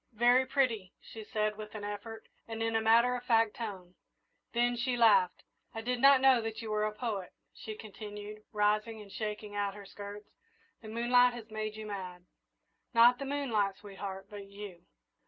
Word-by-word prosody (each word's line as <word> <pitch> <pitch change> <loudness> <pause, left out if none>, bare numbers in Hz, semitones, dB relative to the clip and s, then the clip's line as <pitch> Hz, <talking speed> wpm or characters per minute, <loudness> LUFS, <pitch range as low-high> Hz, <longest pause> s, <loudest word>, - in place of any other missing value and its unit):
"Very 245 +3 +4
pretty," 235 -9 0
she 220 - -10
said, 215 -1 -1
with 215 0 -8
an 210 - -6
effort, 205 +2 -6 0.2
and 225 0 -4
in 225 0 0
a 225 - +3
matter 230 +3 +5
of 245 - -5
fact 225 -3 +3
tone, 190 -6 -6 0.6
then 240 +1 +2
she 245 +1 -1
laughed. 450 - +4 0.3
"I 225 - -3
did 245 +1 -2
not 275 -1 +7
know 260 -3 +5
you 225 0 -5
were 210 0 +1
a 215 - -1
poet," 210 -4 -4 0.2
she 215 - -7
continued, 210 0 -9
rising 215 +1 +1
and 205 -2 -12
shaking 210 -1 -5
out 205 -1 -1
her 205 -1 -10
skirts, 205 +1 -9 0.5
"the 220 - -10
moonlight 245 +2 +4
has 225 -2 -10
made 215 0 -3
you 215 0 -7
mad." 185 -4 -6 0.7
"Not 240 +2 +7
the 275 - -4
moonlight, 235 -9 0
sweetheart, 195 -1 -7
but 205 -1 -9
you!" 200 -3 -10
215 Hz, 175 wpm, -32 LUFS, 205-235 Hz, 0.7 s, not